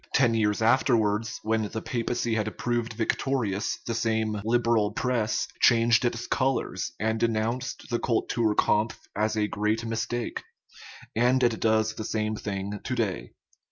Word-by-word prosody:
Ten 125 Hz, -4 st, +4 dB
years 110 Hz, -1 st, +1 dB
afterwards, 110 Hz, -3 st, +2 dB
when 110 Hz, -1 st, 0 dB
the 110 Hz, -, -4 dB
papacy 120 Hz, 0 st, -2 dB
had 110 Hz, -1 st, -2 dB
proved 120 Hz, -1 st, -1 dB
victorious, 110 Hz, -2 st, -1 dB
the 115 Hz, -, -2 dB
same 110 Hz, -2 st, 0 dB
" -, -, -13 dB
Liberal 115 Hz, -2 st, +2 dB
press 115 Hz, -3 st, 0 dB
" -, -, -22 dB
changed 115 Hz, 0 st, +5 dB
its 120 Hz, 0 st, -1 dB
colors, 135 Hz, 0 st, -1 dB
and 110 Hz, +2 st, 0 dB
denounced 115 Hz, +2 st, -1 dB
the 120 Hz, -, +1 dB
cultur 115 Hz, -2 st, 0 dB
kampf 110 Hz, +2 st, +1 dB
as 110 Hz, +1 st, 0 dB
a 105 Hz, -, +2 dB
great 105 Hz, +2 st, -1 dB
mistake; 115 Hz, +1 st, -3 dB, 0.7 s
and 125 Hz, +3 st, +3 dB
it 120 Hz, -2 st, +2 dB
does 110 Hz, 0 st, +2 dB
the 110 Hz, -, -6 dB
same 110 Hz, 0 st, -1 dB
thing 100 Hz, 0 st, -4 dB
to -, -, -2 dB
day. -, -, -2 dB
110 Hz, 155 wpm, -27 LUFS, 110-120 Hz, 0.7 s, changed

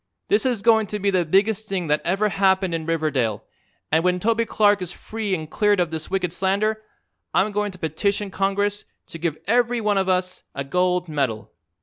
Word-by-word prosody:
This 405 Hz, -10 st, +3 dB
is 235 Hz, -5 st, -1 dB
goin' 220 Hz, -2 st, +4 dB
to 210 Hz, -, -3 dB
be 200 Hz, 0 st, 0 dB
the 180 Hz, -2 st, +1 dB
biggest 205 Hz, +5 st, +1 dB
thing 190 Hz, -3 st, -1 dB
that 150 Hz, -1 st, +1 dB
ever 195 Hz, +5 st, +1 dB
happened 190 Hz, -2 st, +2 dB
in 165 Hz, -1 st, -3 dB
Riverdale 145 Hz, -10 st, 0 dB, 0.5 s
and 160 Hz, +2 st, +3 dB
when 180 Hz, 0 st, +2 dB
Toby 230 Hz, +4 st, +1 dB
Clark 205 Hz, -2 st, +3 dB
is 180 Hz, -, -4 dB
free 215 Hz, -3 st, -3 dB
and 160 Hz, -3 st, -6 dB
cleared 205 Hz, +4 st, +2 dB
of 175 Hz, -2 st, 0 dB
this 160 Hz, -1 st, -5 dB
wicked 180 Hz, -3 st, -1 dB
slander 200 Hz, +4 st, 0 dB, 0.5 s
I'm 210 Hz, +2 st, +3 dB
going 205 Hz, 0 st, -1 dB
to 185 Hz, -, -11 dB
petition 195 Hz, +5 st, -1 dB
Congress 200 Hz, +2 st, 0 dB, 0.2 s
to 170 Hz, -2 st, -10 dB
give 160 Hz, -2 st, -2 dB
every 240 Hz, +3 st, +2 dB
one 210 Hz, -2 st, +1 dB
of 190 Hz, 0 st, 0 dB
us 185 Hz, 0 st, 0 dB
a 140 Hz, -, -2 dB
gold 180 Hz, +4 st, 0 dB
medal. 120 Hz, -9 st, -2 dB
190 Hz, 200 wpm, -23 LUFS, 165-210 Hz, 0.5 s, goin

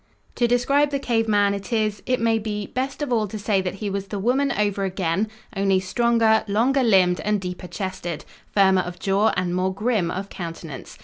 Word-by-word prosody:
To 240 Hz, -, +1 dB
describe 275 Hz, +5 st, +2 dB
the 280 Hz, -, -1 dB
cave 235 Hz, -4 st, 0 dB
man 205 Hz, -2 st, +3 dB
it 200 Hz, +2 st, -6 dB
is, 215 Hz, -2 st, 0 dB
it 255 Hz, 0 st, +1 dB
may 225 Hz, -1 st, +2 dB
be, 210 Hz, -1 st, -3 dB
best 265 Hz, +6 st, -3 dB
of 265 Hz, -4 st, -1 dB
all 220 Hz, -2 st, +1 dB
to 215 Hz, -, -6 dB
say 205 Hz, -1 st, +1 dB
that 185 Hz, 0 st, -3 dB
he 205 Hz, +1 st, -5 dB
was 195 Hz, 0 st, -3 dB
the 205 Hz, -, -4 dB
woman 260 Hz, +7 st, +1 dB
over 205 Hz, -1 st, 0 dB
again, 190 Hz, +1 st, 0 dB, 0.3 s
only 195 Hz, -1 st, +2 dB
stronger, 225 Hz, +2 st, +2 dB
longer 240 Hz, +7 st, +2 dB
limbed 185 Hz, -7 st, +4 dB
and 210 Hz, +4 st, 0 dB
deeper 180 Hz, -1 st, -6 dB
chested, 185 Hz, -4 st, -5 dB, 0.3 s
firmer 190 Hz, -2 st, +4 dB
of 180 Hz, 0 st, -7 dB
jaw 195 Hz, +3 st, +2 dB
and 180 Hz, -1 st, 0 dB
more 185 Hz, +1 st, 0 dB
grim 205 Hz, -2 st, 0 dB
of 195 Hz, +3 st, -4 dB
countenance. 165 Hz, -5 st, -8 dB
205 Hz, 200 wpm, -23 LUFS, 190-230 Hz, 0.3 s, limbed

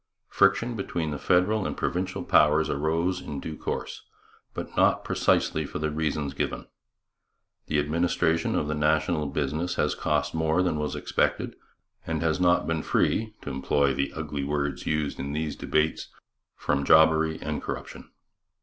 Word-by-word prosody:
Friction 115 Hz, +5 st, +3 dB
between 85 Hz, -6 st, -3 dB
the 70 Hz, -, -4 dB
federal 95 Hz, +3 st, +2 dB
and -, -, -5 dB
provincial 90 Hz, +2 st, -2 dB
powers 75 Hz, +1 st, +4 dB
arose 85 Hz, +5 st, 0 dB
in 70 Hz, -5 st, -6 dB
due 80 Hz, +3 st, -6 dB
course, -, -, -4 dB, 0.5 s
but -, -, -6 dB
not -, -, +3 dB
precisely -, -, +1 dB
for -, -, -6 dB
the 75 Hz, 0 st, -1 dB
reasons 75 Hz, -2 st, -2 dB
given. -, -, -3 dB, 1.0 s
The 75 Hz, -, 0 dB
administration 80 Hz, +2 st, +1 dB
of 75 Hz, -, 0 dB
the 75 Hz, -, -1 dB
national 75 Hz, +1 st, +1 dB
business 75 Hz, +5 st, -2 dB
has -, -, +1 dB
cost -, -, -1 dB
more 80 Hz, +2 st, +1 dB
than 80 Hz, -4 st, 0 dB
was 75 Hz, -1 st, -2 dB
expected, -, -, -1 dB, 0.5 s
and 80 Hz, 0 st, -1 dB
has 80 Hz, +1 st, +1 dB
not 90 Hz, -1 st, +3 dB
been 80 Hz, -1 st, -1 dB
free, 110 Hz, +6 st, 0 dB
to 70 Hz, -, -5 dB
employ 70 Hz, +1 st, +1 dB
the 70 Hz, +1 st, -1 dB
ugly 75 Hz, -2 st, -4 dB
words 70 Hz, -1 st, -2 dB
used 75 Hz, -2 st, -1 dB
in 70 Hz, +1 st, -4 dB
these 75 Hz, 0 st, -2 dB
debates, 75 Hz, +1 st, 0 dB, 0.5 s
from 70 Hz, -1 st, -1 dB
jobbery 80 Hz, +1 st, +5 dB
and 75 Hz, 0 st, -3 dB
corruption. -, -, -7 dB
80 Hz, 155 wpm, -26 LUFS, 75-85 Hz, 1.0 s, jobbery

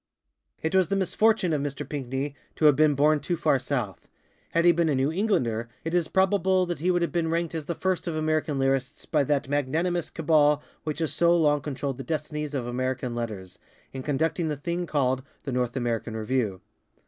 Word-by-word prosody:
It 160 Hz, -, -1 dB
was 190 Hz, -2 st, +4 dB
the 195 Hz, -, 0 dB
misfortune 195 Hz, -1 st, +2 dB
of 145 Hz, -, 0 dB
Mr. 140 Hz, 0 st, -4 dB
Pinckney 135 Hz, 0 st, -3 dB, 0.2 s
to 155 Hz, -, +1 dB
have 150 Hz, -2 st, +7 dB
been 155 Hz, -1 st, +4 dB
born 150 Hz, +2 st, +4 dB
too 175 Hz, +3 st, -2 dB
far 140 Hz, -4 st, +2 dB
south. 125 Hz, -8 st, -3 dB, 0.4 s
Had 170 Hz, +1 st, +1 dB
he 175 Hz, -, +8 dB
been 170 Hz, -1 st, +1 dB
a 145 Hz, -, +2 dB
New 135 Hz, +3 st, +1 dB
Englander, 125 Hz, -, 0 dB
it 165 Hz, -, -3 dB
is 175 Hz, -3 st, +2 dB
probable 190 Hz, 0 st, +2 dB
that 175 Hz, -2 st, -4 dB
he 175 Hz, +4 st, 0 dB
would 175 Hz, -1 st, +2 dB
have 170 Hz, -, -1 dB
been 170 Hz, -2 st, 0 dB
ranked 170 Hz, 0 st, -1 dB
as 160 Hz, -2 st, -4 dB
the 170 Hz, -, -2 dB
first 185 Hz, 0 st, -1 dB
of 165 Hz, -, -2 dB
American 155 Hz, -2 st, 0 dB
lyrists 135 Hz, -1 st, -1 dB
by 150 Hz, -3 st, +2 dB
that 140 Hz, -1 st, 0 dB
magnanimous 155 Hz, +5 st, 0 dB
cabal 150 Hz, -2 st, +3 dB, 0.2 s
which 155 Hz, -1 st, -2 dB
has 160 Hz, -2 st, -1 dB
so 170 Hz, 0 st, +4 dB
long 150 Hz, -3 st, +3 dB
controlled 140 Hz, -2 st, -4 dB
the -, -, -4 dB
destinies 150 Hz, +1 st, -3 dB
of 130 Hz, -3 st, -2 dB
American 130 Hz, 0 st, -2 dB
Letters, 105 Hz, -6 st, -5 dB, 0.3 s
in 130 Hz, -, -5 dB
conducting 160 Hz, +4 st, 0 dB
the 150 Hz, -2 st, -2 dB
thing 170 Hz, +4 st, -3 dB
called 130 Hz, -4 st, +1 dB, 0.2 s
ŌĆ£The 135 Hz, -, -3 dB
North 125 Hz, 0 st, -1 dB
American 115 Hz, -2 st, -2 dB
Review. 110 Hz, -4 st, -1 dB
150 Hz, 205 wpm, -26 LUFS, 130-170 Hz, 0.4 s, he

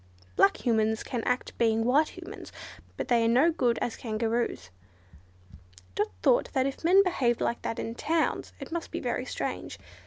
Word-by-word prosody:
Black 195 Hz, -, +3 dB
Humans 220 Hz, -2 st, +2 dB
can 240 Hz, -3 st, -4 dB
act 250 Hz, +1 st, -1 dB
being 225 Hz, -1 st, +2 dB
white 295 Hz, +8 st, +2 dB
Humans, 370 Hz, +4 st, -9 dB, 0.5 s
but -, -, -3 dB
they 235 Hz, -2 st, +3 dB
are -, -, +3 dB
no 260 Hz, +9 st, +4 dB
good 245 Hz, -7 st, +1 dB
as 235 Hz, -, -2 dB
Kangaroos." 225 Hz, -, -2 dB, 1.2 s
Dot -, -, 0 dB, 0.2 s
thought 240 Hz, -, +3 dB
that 260 Hz, -1 st, +2 dB
if 275 Hz, +3 st, -4 dB
men 375 Hz, +4 st, +6 dB
behaved 255 Hz, -11 st, +1 dB
like 235 Hz, -, -1 dB
that 230 Hz, -, -3 dB
in 225 Hz, -, -4 dB
towns 320 Hz, +6 st, -1 dB
it -, -, -8 dB
must 335 Hz, 0 st, -4 dB
be -, -, -4 dB
very -, -, -2 dB
strange. -, -, -4 dB
240 Hz, 175 wpm, -28 LUFS, 230-315 Hz, 1.2 s, men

